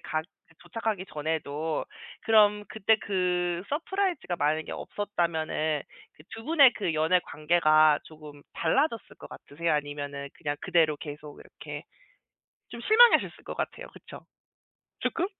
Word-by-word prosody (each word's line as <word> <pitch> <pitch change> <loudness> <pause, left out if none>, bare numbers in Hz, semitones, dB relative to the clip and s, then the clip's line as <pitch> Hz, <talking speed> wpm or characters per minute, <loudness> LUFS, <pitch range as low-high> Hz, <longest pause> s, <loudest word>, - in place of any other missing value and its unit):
가 155 - -2 0.4
도착하기 200 +1 -3
전에도. 155 0 -2 0.4
그럼 210 -2 +4
그때 220 +1 +2
그 180 -2 -1
서프라이즈가 345 - -1
만약에 155 0 0
없었다면은 160 -6 -2 0.3
그 - - -18
두 225 - -9
분의 285 -5 +6
그 175 -6 -2
연애 160 +4 +3
관계가 155 -1 +3
조금 150 -2 -13
달라졌을 265 -6 0
것 - - -11
같으세요? 165 +4 -3
아니면은 145 -1 -3
그냥 145 -2 -4
그대로 160 -3 +2
계속 150 -1 -9
이렇게 - - -9 0.9
좀 - - -8
실망하셨을 470 - +5
것 - - -7
같아요. - - -4
그쵸? - - -12 0.8
조금? 345 - -1
170 Hz, 295 characters per minute, -27 LUFS, 150-210 Hz, 0.9 s, 분의